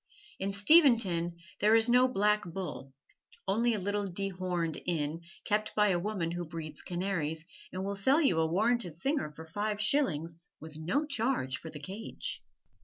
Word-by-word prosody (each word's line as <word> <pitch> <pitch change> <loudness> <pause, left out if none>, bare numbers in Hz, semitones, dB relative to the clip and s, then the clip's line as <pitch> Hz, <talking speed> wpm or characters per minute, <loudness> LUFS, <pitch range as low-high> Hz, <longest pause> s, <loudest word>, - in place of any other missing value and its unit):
In 195 +1 -1
Steventon 200 - +4 0.2
there 215 +2 +5
is 225 0 +5
no 250 +1 +5
"Black 210 -3 +2
Bull"; 175 -6 -6 0.6
only 230 +4 +2
a - - -2
little 205 +1 -1
dehorned 180 -3 -2
inn, 160 -1 -1 0.2
kept 215 +1 0
by 210 -1 +4
a 175 -2 +2
woman 180 -3 -2
who 175 0 -3
breeds 155 -2 -7
canaries, 170 -4 -2 0.3
and 185 +1 -4
will 200 - -2
sell 260 +10 +3
you 270 - +3
a 160 - +3
warranted 215 -2 +1
singer 270 - -1
for 160 - -9
five 205 +5 -2
shillings, 170 - +1 0.2
with 155 0 -10
no 260 - 0
charge 235 - -1
for 160 - -8
the 150 - -9
cage. 195 +9 -6
195 Hz, 165 wpm, -31 LUFS, 165-215 Hz, 0.6 s, there